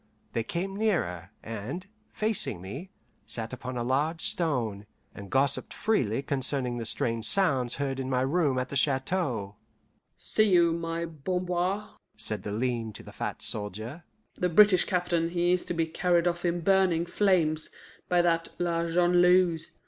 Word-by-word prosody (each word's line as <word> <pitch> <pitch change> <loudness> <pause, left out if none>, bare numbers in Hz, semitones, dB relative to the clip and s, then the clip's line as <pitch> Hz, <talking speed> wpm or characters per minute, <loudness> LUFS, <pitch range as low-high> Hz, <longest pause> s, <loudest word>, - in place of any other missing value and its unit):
They 115 - 0
came 180 +10 -3
nearer, 130 - -1
and, 115 - -5 0.3
facing 205 - -1
me, 120 - -7 0.4
sat 115 +1 -4
upon 130 0 -5
a 120 - -1
large 150 +6 0
stone, 115 - 0 0.3
and 100 -1 -10
gossiped 135 +3 0
freely 135 - 0
concerning 130 -2 0
the 115 - -3
strange 115 0 0
sounds 135 - +3
heard 135 -1 -2
in 130 0 -3
my 130 -1 +1
room 140 0 +1
at 125 0 -2
the - - -5
chateau. 130 - 0 0.6
"See 215 -1 +1
you, 170 -3 +5
my 165 0 -3
Bamboir," 180 +5 -2 0.2
said 105 -3 -3
the 105 - -5
lean 115 0 -2
to - - -11
the - - -11
fat - - -4
soldier, 110 - -5 0.3
"the 180 - -1
British 190 +1 +6
captain, 175 -2 0
he 175 0 +1
is 180 - -1
to - - -3
be 165 -1 +1
carried 170 +1 +1
off 175 0 -1
in 175 0 0
burning 185 -2 +3
flames 170 -5 +1 0.4
by 175 -1 +4
that 165 -1 +1
La 170 -1 0
Jongleuse. 175 -1 +3
160 Hz, 155 wpm, -28 LUFS, 125-175 Hz, 0.6 s, British